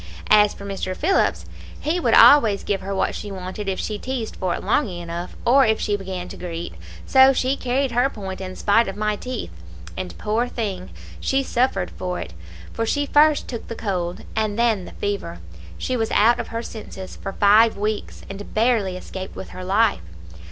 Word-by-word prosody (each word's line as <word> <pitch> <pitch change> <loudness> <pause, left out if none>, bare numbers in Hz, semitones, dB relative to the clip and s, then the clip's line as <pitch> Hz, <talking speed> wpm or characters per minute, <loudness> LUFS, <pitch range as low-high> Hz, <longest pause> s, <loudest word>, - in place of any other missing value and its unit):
As 210 -1 +6
for 200 - -10
Mr. 190 -2 -4
Phillips, 380 +6 +1 0.3
he 325 +4 0
would - - +3
always 225 -9 +7
give 200 -1 -1
her 195 +1 -4
what - - 0
she 205 - -6
wanted 190 +2 -5
if 190 - -2
she 210 -1 -3
teased 255 -4 -4
for 185 -3 -1
it - - -7
long 285 -7 +1
enough, 175 0 -6
or 270 +3 +6
if 220 -2 +2
she 205 - 0
began 190 -2 -5
to - - -8
greet, 170 -1 -5 0.3
so 265 0 +6
she 260 +1 +1
carried 260 0 -1
her 245 +3 +2
point 195 -6 -7
in 185 -1 -6
spite 225 +3 +3
of 195 - -4
my 210 0 0
teeth. 250 - -5 0.4
And, 185 - -6
poor 220 +3 0
thing, 200 -7 -4 0.3
she 270 0 +1
suffered 240 -8 0
for 180 -1 -4
it; 85 - -7 0.4
for 230 - -2
she 285 +6 0
first 300 +1 +4
took 235 -3 -6
the 230 - -5
cold, 180 -5 -3
and 215 -1 0
then 225 -6 +2
the - - -10
fever; 200 - -3 0.4
she 255 - -2
was 225 -2 0
out 235 +3 +4
of - - -3
her 230 +1 -4
senses 195 -5 -8
for 195 - -6
five 215 +3 +5
weeks, 210 +1 -3
and 195 +1 -9
barely 215 -5 +2
escaped 190 +1 -8
with - - -7
her 185 - -8
life. 200 - +2
210 Hz, 195 wpm, -22 LUFS, 190-240 Hz, 0.4 s, always